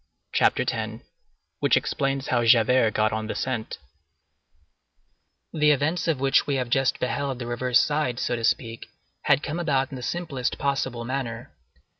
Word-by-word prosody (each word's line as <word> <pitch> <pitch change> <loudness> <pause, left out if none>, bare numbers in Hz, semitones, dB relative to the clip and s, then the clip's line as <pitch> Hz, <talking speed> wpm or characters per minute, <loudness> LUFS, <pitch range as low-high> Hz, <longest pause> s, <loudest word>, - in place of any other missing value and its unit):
CHAPTER - - +2
X—WHICH - - -3
EXPLAINS 135 -1 -1
HOW 120 -1 +2
JAVERT 115 0 +4
GOT 110 0 +2
ON 110 0 -3
THE - - -4
SCENT 125 -4 -3 1.8
The 150 -2 +3
events 150 +4 +1
of 160 -5 +1
which 135 0 +2
we 140 - 0
have 125 -2 -2
just 135 0 +2
beheld 135 +1 -2
the 125 - -6
reverse 120 +1 +2
side, 145 -5 0
so 120 - -1
to 115 - -5
speak, 115 0 -1 0.4
had - - +3
come 160 +3 -3
about 135 -6 0
in 135 - -6
the - - -7
simplest 145 -4 -3
possible 130 -4 -2
manner. 120 -3 -4
130 Hz, 155 wpm, -25 LUFS, 120-140 Hz, 1.8 s, JAVERT